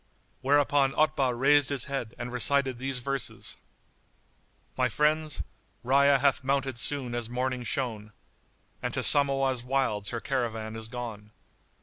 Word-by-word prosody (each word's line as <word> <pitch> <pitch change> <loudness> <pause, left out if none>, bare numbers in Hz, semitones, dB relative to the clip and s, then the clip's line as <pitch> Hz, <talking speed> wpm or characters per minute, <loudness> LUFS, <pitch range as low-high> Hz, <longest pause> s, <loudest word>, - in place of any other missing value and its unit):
[FN#86] - - -39
Whereupon 145 0 +3
Otbah 135 -5 +1
raised 145 +1 +4
his 140 -3 +1
head 135 -5 -5
and 120 +1 -6
recited 130 0 +2
these 135 0 -2
verses, 135 +2 -3 1.2
"My - - +1
friends, 150 - 0 0.4
Rayya 140 +2 +4
hath 135 -1 +1
mounted 135 -2 -1
soon 130 -4 -1
as 120 -1 -3
morning 125 +1 -2
shone, 115 -4 -3 0.3
* - - -39
And - - -3
to - - -1
Samawah's 135 -3 +5
wilds 125 -6 -1
her 120 - -4
caravan 115 -4 -3
is 110 0 -7
gone. 115 -4 -7
130 Hz, 140 wpm, -27 LUFS, 120-140 Hz, 1.2 s, Samawah's